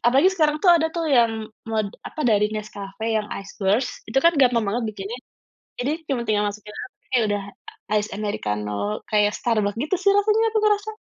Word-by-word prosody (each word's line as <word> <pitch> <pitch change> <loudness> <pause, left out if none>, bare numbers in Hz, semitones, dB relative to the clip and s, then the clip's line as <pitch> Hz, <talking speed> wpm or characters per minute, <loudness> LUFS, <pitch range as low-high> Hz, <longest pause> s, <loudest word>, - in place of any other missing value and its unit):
Apalagi 270 +9 +5
sekarang 305 -4 +2
tuh 370 - +6
ada 320 -1 +2
tuh 335 -1 -1
yang 230 -2 +4 0.4
meled 215 -2 0 0.2
apa - - -8
dari 210 -1 +4
Nescafe, 215 -1 -6
yang 210 -1 -1
ice 195 0 -12
roast, 205 +7 +2 0.2
itu 225 - +2
kan 335 - +7
gampang 245 -3 +4
banget 225 +5 -1
bikinnya. 205 +2 -6 0.6
Jadi 255 +4 0 0.2
cuma 260 -3 0
tinggal 210 -1 +1
masukin 210 +1 -10 0.4
kayak 245 -3 +4
udah 205 -1 -1 0.5
ice 210 0 -1
americano, 105 - -2
kayak 210 -1 +3
Starbucks 215 -3 0
gitu 305 +9 0
sih 400 - +5
rasanya 430 +2 +3
aku 435 - +2
ngerasa. 420 0 +2
220 Hz, 180 wpm, -23 LUFS, 205-290 Hz, 0.6 s, kan